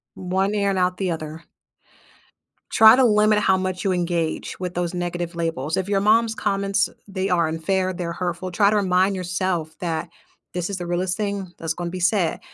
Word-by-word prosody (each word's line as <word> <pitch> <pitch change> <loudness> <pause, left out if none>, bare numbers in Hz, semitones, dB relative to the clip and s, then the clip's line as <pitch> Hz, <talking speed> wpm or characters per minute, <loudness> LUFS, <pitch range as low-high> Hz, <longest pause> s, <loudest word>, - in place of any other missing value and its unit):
One 190 +2 -1
ear 200 -1 +1
and 195 - 0
out 180 0 +1
the 190 -1 -1
other. 155 0 -6 1.3
Try 220 +1 +8
to 260 - +4
limit 210 -2 +4
how 190 -2 +3
much 185 -1 -3
you 195 - +1
engage 170 -3 -2
with 180 -1 -4
those 175 -1 -2
negative 175 -1 -3
labels, 160 -3 -2
if 190 - -1
your 200 -1 +2
mom's 220 +2 +3
comments 200 -1 0 0.2
they 195 -1 -2
are 170 -2 +2
unfair, 185 +4 -1
they're 175 -1 -4
hurtful, 180 +1 -3
try 200 +3 +4
to 215 - +1
remind 190 -1 +2
yourself 180 -3 -2
that 165 -1 -3 0.4
this 180 +1 -2
is 200 - -3
the 175 -1 -5
realest 180 +1 -1
thing 200 -3 -3
that's 165 -1 -2
gonna 175 +1 -4
be 185 - -5
said- 180 -1 +1
185 Hz, 190 wpm, -23 LUFS, 175-195 Hz, 1.3 s, Try